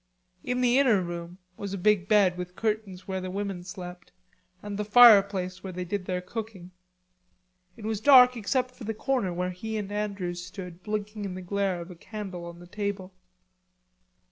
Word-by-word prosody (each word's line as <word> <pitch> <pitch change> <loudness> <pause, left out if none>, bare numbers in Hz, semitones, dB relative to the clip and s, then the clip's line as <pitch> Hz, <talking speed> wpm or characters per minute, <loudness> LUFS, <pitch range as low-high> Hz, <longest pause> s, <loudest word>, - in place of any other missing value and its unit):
In 250 0 -1
the 250 +1 +4
inner 245 -8 +4
room 175 0 -6 0.2
was 200 -1 -4
a - - -4
big 195 0 +2
bed 200 -4 +4
with 180 0 -7
curtains 210 -4 -3
where 190 -1 -3
the 185 - -5
women 195 -1 -4
slept, 180 -2 -9 0.5
and 205 -1 -5
the 210 - -2
fireplace 200 -5 +6
where 190 - -5
they 180 0 -4
did 185 +1 -3
their 180 -1 -2
cooking. 195 -2 -7 1.1
It 215 - -9
was 220 -1 -2
dark 250 -1 +8
except 250 +3 -1
for 250 - -12
the 225 +1 -3
corner 250 -5 0
where 180 +1 -2
he 220 +5 -5
and 205 -1 -4
Andrews 195 -4 -3
stood 180 -1 -9
blinking 210 0 -4
in 190 -2 -4
the 185 - -6
glare 195 -1 -1
of 170 +2 -9
a - - -10
candle 190 -2 -7
on 170 0 -9
the 175 - -12
table. 200 0 -4
195 Hz, 185 wpm, -27 LUFS, 180-215 Hz, 1.1 s, dark